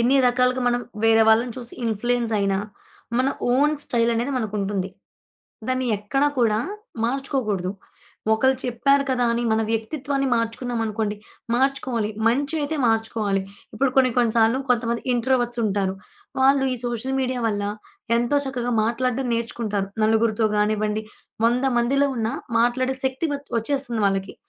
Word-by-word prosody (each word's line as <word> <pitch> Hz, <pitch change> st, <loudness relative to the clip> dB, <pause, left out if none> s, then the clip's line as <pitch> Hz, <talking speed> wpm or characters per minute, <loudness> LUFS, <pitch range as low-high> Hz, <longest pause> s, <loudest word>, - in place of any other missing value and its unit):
ఎన్ని 250 Hz, +4 st, +4 dB
రకాలుగా 250 Hz, +1 st, +2 dB
మనం 245 Hz, 0 st, +1 dB, 0.2 s
వేరే 225 Hz, 0 st, +6 dB
వాళ్ళని 230 Hz, +2 st, +4 dB
చూసి 245 Hz, -2 st, -6 dB
ఇన్‌ఫ్లూయెన్సయినా, 220 Hz, -3 st, 0 dB, 0.6 s
మన 260 Hz, +1 st, +3 dB, 0.3 s
ఓన్ 295 Hz, +3 st, +3 dB
స్టైలనేది 235 Hz, +2 st, 0 dB
మనకుంటుంది. 200 Hz, -4 st, -2 dB, 0.8 s
దాన్ని 255 Hz, 0 st, 0 dB
ఎక్కడా 270 Hz, +8 st, +1 dB
కూడా 220 Hz, -3 st, +3 dB, 0.5 s
మార్చుకోగూడదు. 235 Hz, -7 st, -1 dB, 0.6 s
ఒకళ్ళు 260 Hz, +4 st, +2 dB
చెప్పారు 275 Hz, +3 st, +2 dB
కదా! 250 Hz, -1 st, +1 dB
అని 235 Hz, +1 st, -1 dB
మన 220 Hz, -, +2 dB
వ్యక్తిత్వాన్ని 275 Hz, +4 st, -1 dB
మార్చుకున్నామనుకోండి 225 Hz, -2 st, -2 dB, 0.4 s
మార్చుకోవాలి, 250 Hz, -4 st, 0 dB, 0.2 s
మంచయితే 290 Hz, +5 st, 0 dB
మార్చుకోవాలి. 220 Hz, -3 st, 0 dB, 0.3 s
ఇప్పుడు 275 Hz, -1 st, +1 dB
కొన్ని 260 Hz, -1 st, +5 dB
కొన్ని 235 Hz, -2 st, +3 dB
సార్లు 230 Hz, +4 st, +4 dB
కొంతమంది 235 Hz, -1 st, +1 dB
ఇంట్రోవర్ట్స్ 240 Hz, -1 st, +1 dB
ఉంటారు. 195 Hz, -2 st, 0 dB, 0.5 s
వాళ్ళు 270 Hz, +1 st, +4 dB
ఈ -, -, -5 dB
సోషల్ 240 Hz, +3 st, -2 dB
మీడియా 255 Hz, -1 st, -1 dB
వల్ల 205 Hz, -1 st, -1 dB, 0.5 s
ఎంతో 240 Hz, +5 st, +1 dB
చక్కగా 245 Hz, -2 st, -2 dB
మాట్లాడ్డం 250 Hz, +3 st, 0 dB
నేర్చుకుంటారు. 220 Hz, -4 st, -2 dB, 0.2 s
నలుగురితో 220 Hz, 0 st, +2 dB
గానివ్వండి, 210 Hz, 0 st, +1 dB, 0.4 s
100 245 Hz, +3 st, +1 dB
మందిలో 275 Hz, +4 st, +2 dB
ఉన్నా 225 Hz, -1 st, -1 dB, 0.3 s
మాట్లాడే 255 Hz, +2 st, +1 dB
శక్తి 265 Hz, +5 st, -3 dB
వచి 285 Hz, 0 st, -8 dB
ఓచ్చేస్తుంది 240 Hz, -1 st, -2 dB
వాళ్ళకి. 195 Hz, 0 st, -1 dB
235 Hz, 125 wpm, -23 LUFS, 220-260 Hz, 0.8 s, వేరే